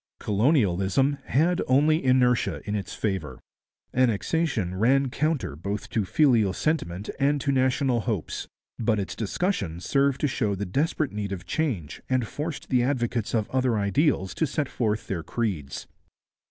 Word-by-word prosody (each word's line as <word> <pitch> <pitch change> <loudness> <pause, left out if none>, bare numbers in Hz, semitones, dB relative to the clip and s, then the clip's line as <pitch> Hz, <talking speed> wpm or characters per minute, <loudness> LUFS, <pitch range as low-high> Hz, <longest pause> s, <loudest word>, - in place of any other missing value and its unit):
Colonialism 110 - +2
had 170 +6 +2
only 150 +5 +3
inertia 125 -2 +2
in 105 - -2
its 100 -2 -3
favour. 95 -8 -3 0.5
Annexation 125 - +1
ran 130 +7 +2
counter 135 - -1
both 100 +6 -5
to 110 -3 0
filial 115 - +3
sentiment 100 - -2
and 145 +1 +2
to 140 - +1
national 130 -1 +2
hopes, 110 -7 -3 0.3
but 110 -2 +1
its 95 - -4
discussion 105 - -2
served 140 +6 +1
to 150 - +3
show 110 -7 0
the 100 +2 -3
desperate 145 - 0
need 105 -1 -4
of 95 -1 -5
change 100 - -2
and 130 -2 +1
forced 150 0 -5
the 125 -1 +3
advocates 120 -4 -1
of 110 -2 +1
other 130 -3 +1
ideals 100 - +1
to 160 - 0
set 145 +1 -1
forth 110 -3 -1
their 90 -4 -3
creeds. 80 - -3
120 Hz, 150 wpm, -26 LUFS, 100-140 Hz, 0.5 s, only